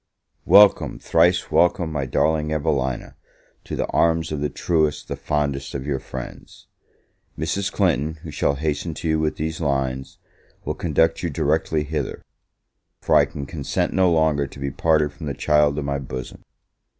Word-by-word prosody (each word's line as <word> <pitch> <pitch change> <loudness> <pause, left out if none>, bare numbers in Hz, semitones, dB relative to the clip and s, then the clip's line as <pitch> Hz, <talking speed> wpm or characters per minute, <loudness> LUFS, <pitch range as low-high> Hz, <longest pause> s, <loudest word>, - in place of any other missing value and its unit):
WELCOME, 105 0 +6
thrice 85 +2 +2
welcome, 85 -1 +2
my 70 -3 -2
darling 75 +2 +1
Evelina, 70 -5 -1 0.5
to - - -5
the - - -1
arms 80 -1 +1
of 75 -2 -3
the 75 - 0
truest, 75 -1 0
the - - -4
fondest 70 -2 -2
of 65 -1 -4
your 70 -2 -1
friends! - - -9 0.7
Mrs. 80 +6 -2
Clinton, 75 +5 +1
who 80 - -7
shall 70 0 0
hasten 75 +2 -2
to 80 - -5
you 80 0 +2
with 80 -1 0
these 80 +1 -4
lines, 65 -3 -2 0.5
will - - -1
conduct 80 0 +1
you 85 - -1
directly 75 +1 0
hither; 75 +1 -4 0.8
for - - -1
I - - +6
can 70 - -7
consent 70 -2 -2
no 95 -2 +3
longer 80 -3 +2
to 70 - -13
be 70 0 -3
parted 75 -1 +1
from 75 +1 -8
the 70 - -3
child 75 -1 +2
of 75 - -2
my 70 0 -1
bosom! 65 -1 -7
75 Hz, 165 wpm, -22 LUFS, 70-80 Hz, 0.8 s, WELCOME